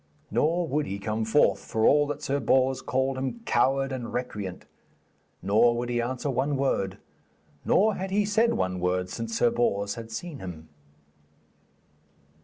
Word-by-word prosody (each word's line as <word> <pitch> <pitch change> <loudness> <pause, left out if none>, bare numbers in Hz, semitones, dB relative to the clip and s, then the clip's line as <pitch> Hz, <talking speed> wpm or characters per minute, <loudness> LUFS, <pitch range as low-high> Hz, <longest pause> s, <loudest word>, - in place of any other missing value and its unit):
Nor 160 +10 +1
would 150 +1 -1
he 100 - -3
come 110 +2 -2
forth, 110 -4 +3
for 110 0 0
all 145 0 +5
that 145 +1 -5
Sir 140 -1 0
Bors 130 -1 +2
called 130 0 -1
him 135 - -4
coward 135 +3 +2
and 125 -3 -5
recreant. 105 -7 -5 0.8
Nor 110 +5 +4
would 120 0 -3
he 120 -1 0
answer 130 +4 -2
one 135 +3 0
word, 100 -8 0 0.7
nor 215 +2 +4
had 190 0 -4
he 205 +2 +1
said 220 +3 +2
one 95 -1 -1
word 90 +1 0
since 115 -1 -4
Sir 120 - +3
Bors 100 -4 0
had 115 -1 -8
seen 145 +6 -6
him. 80 -4 -8
125 Hz, 160 wpm, -27 LUFS, 105-140 Hz, 0.8 s, all